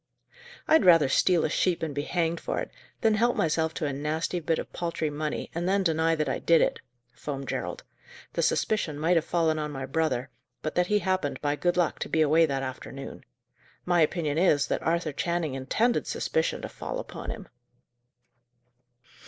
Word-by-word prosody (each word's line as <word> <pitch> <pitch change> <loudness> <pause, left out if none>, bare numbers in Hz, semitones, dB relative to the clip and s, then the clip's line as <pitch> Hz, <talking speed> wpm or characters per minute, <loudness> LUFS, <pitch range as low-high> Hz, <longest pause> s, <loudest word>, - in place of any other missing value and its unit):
"I'd 320 - +5
rather 165 -6 +6
steal 170 +5 +3
a - - 0
sheep 175 -1 +1
and 155 -2 -2
be 145 - -1
hanged 170 +2 -1
for - - -3
it, - - -5 0.3
than 225 -2 +4
help 235 +3 +2
myself 160 0 +1
to 155 - -2
a 140 - -1
nasty 155 +5 -2
bit 165 0 0
of - - -6
paltry 170 -3 -2
money, 150 +1 -3
and 175 +2 -1
then 195 0 +2
deny 165 -1 +2
that 155 -1 -1
I - - -1
did 165 -1 +4
it!" - - +1 0.3
foamed 135 +2 -6
Gerald. - - -4 0.5
"The - - 0
suspicion 170 -9 0
might 165 +4 +2
have 165 - +2
fallen 160 -2 +1
on 150 0 -2
my 135 -2 -5
brother, 135 -3 -1 0.3
but 155 - -2
that 180 0 +2
he 210 - +3
happened, 185 -7 -1
by 145 0 0
good 175 +3 0
luck, 175 -3 +1
to - - -4
be 160 - +2
away 160 +2 +5
that 135 -2 -2
afternoon. 135 +1 -7 0.6
My 175 -1 +3
opinion 155 -1 +1
is, 155 -6 +4
that - - 0
Arthur 165 -1 0
Channing 170 -1 -1
intended 215 - 0
suspicion 485 0 -1
to - - -3
fall - - -5
upon - - -7
him." 205 -4 -6
160 Hz, 190 wpm, -27 LUFS, 150-175 Hz, 0.6 s, rather